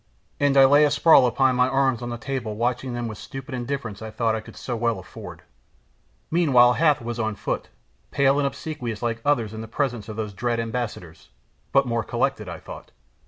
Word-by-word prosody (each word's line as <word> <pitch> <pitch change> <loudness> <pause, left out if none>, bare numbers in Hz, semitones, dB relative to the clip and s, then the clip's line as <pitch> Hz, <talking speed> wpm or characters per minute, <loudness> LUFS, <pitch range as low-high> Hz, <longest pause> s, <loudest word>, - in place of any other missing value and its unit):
And 140 -1 +3
I 135 - +9
lay 145 +2 +6
asprawl 150 -2 +5
upon 130 +2 +2
my 125 0 +3
arms 130 -2 +1
on 120 - -4
the 120 - -4
table 120 -3 -4
watching 120 +2 -1
them 120 -1 -3
with 110 -2 -7
the - - -10
stupid 135 0 -8
indifference 125 -4 -4
I 110 - -6
thought 110 +1 0
I 110 - -3
could - - -14
so 125 - -4
well 115 0 0
afford. - - -10 0.9
Meanwhile 130 -8 +5
Hath 150 -3 +2
was 120 0 -4
on 110 -2 -1
foot, - - -4 0.4
pale 140 +1 +3
and 140 - +2
obsequious 125 -6 -5
like 115 -1 -2
others 120 -7 +1
in 110 - -6
the 115 - -7
presence 120 -3 -2
of 110 - -6
those 105 -2 -4
dread 120 +3 -1
ambassadors, 115 -8 -5 0.4
but 135 0 +4
more 115 -2 -1
collected, - - -1
I - - -6
thought. - - -11
120 Hz, 205 wpm, -24 LUFS, 115-135 Hz, 0.9 s, I